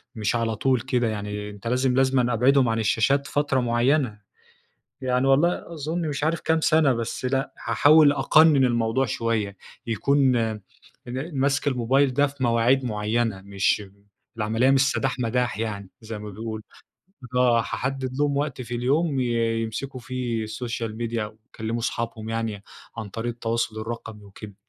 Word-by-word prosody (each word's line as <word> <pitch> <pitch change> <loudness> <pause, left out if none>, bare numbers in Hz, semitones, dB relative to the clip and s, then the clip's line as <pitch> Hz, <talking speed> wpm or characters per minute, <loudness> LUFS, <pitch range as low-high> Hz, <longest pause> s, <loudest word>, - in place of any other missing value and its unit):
مش 110 +1 -1
على 115 -1 0
طول 130 +1 +1
كده 125 -2 0
يعني، 105 -1 -4
أنت 105 +2 -9
لازم 125 +1 +1
لازمًا 130 -2 +2
أبعدهم 130 +2 +4
عن 115 0 0
الشاشات 125 +6 +2
فترة 145 -2 +1
معيّنة، 120 -1 +1 0.8
يعني 125 0 +1
والله 170 +5 +2
أظن 160 +2 -3
مش 145 0 -2
عارف 160 +1 0
كام 160 0 +1
سنة 155 -3 +4
بس 115 +1 -4
لأ 135 +2 -1
هاحاول 145 +6 +6
أقنن 145 0 +5
الموضوع 120 +2 +1
شوية، 110 -3 -2 0.3
يكون 130 +3 +2
إن 120 - -5
مَسْك 140 +1 +1
الموبايل 130 +1 +2
ده 145 +1 +4
في 140 -1 -8
مواعيد 120 +3 +3
معيّنة 110 -1 -1
مش 100 +1 +1
م 100 -1 -12 0.4
العملية 115 +4 +2
مش 135 0 +4
سداح 135 -1 -1
مداح 125 -1 -1
يعني 100 -4 -4
زي 110 -1 -7
ما 105 0 -7
بيقولوا، 110 +2 -6 0.7
آه 125 -2 +4
هاحدد 130 +3 -3
لهم 145 -1 +1
وقت 140 -2 -2
في 120 0 -6
اليوم 140 +4 +1
ي - - +1 0.4
يمسكوا 130 +4 -5
في 120 -2 -3
السوشيال 115 0 -4
ميديا 115 -1 -2
ويكلّموا 110 +1 -6
اصحابهم 115 -1 -3
يعني 115 -3 -3 0.3
عن 110 -3 -5
طريق 115 +4 -4
التواصل 115 -1 -2
الرقمي 110 -2 -7
وكده. 100 +1 -11
120 Hz, 155 wpm, -24 LUFS, 110-135 Hz, 0.8 s, هاحاول